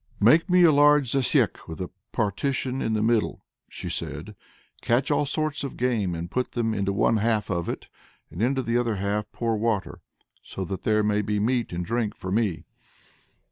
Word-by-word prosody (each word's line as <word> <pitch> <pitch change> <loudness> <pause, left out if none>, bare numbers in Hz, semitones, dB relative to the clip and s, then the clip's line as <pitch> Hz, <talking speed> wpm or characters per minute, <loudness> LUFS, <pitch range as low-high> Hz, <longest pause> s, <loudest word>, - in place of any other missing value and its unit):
"Make 155 - +5
me 180 0 +5
a 165 - +7
large 145 -3 +5
zasyek 135 -2 +1
with 80 - -7
a 90 - -5 0.2
partition 130 +5 -1
in 110 - 0
the 110 0 +1
middle," 115 -1 0 0.2
she - - -7
said; 100 +8 -4 0.5
"catch 125 +4 +1
all 145 - +2
sorts 155 +1 -2
of 140 - -5
game, 110 -8 0
and 85 +2 -6
put 125 0 -2
them 115 -2 0
into 100 -2 0
one 105 +3 +2
half 110 -2 0
of 85 -2 -2
it, - - -4 0.5
and 85 - -6
into 130 +3 +1
the 115 0 +1
other 115 -3 0
half 100 +2 -2
pour 115 -1 -1
water; 110 -2 -1 0.4
so 95 - -6
that 95 0 -5
there 105 -1 +3
may 105 0 +2
be 105 0 -1
meat 120 +2 0
and 85 0 -3
drink 115 -1 -1
for 95 - -6
me." 105 -5 0
110 Hz, 190 wpm, -25 LUFS, 100-125 Hz, 0.5 s, a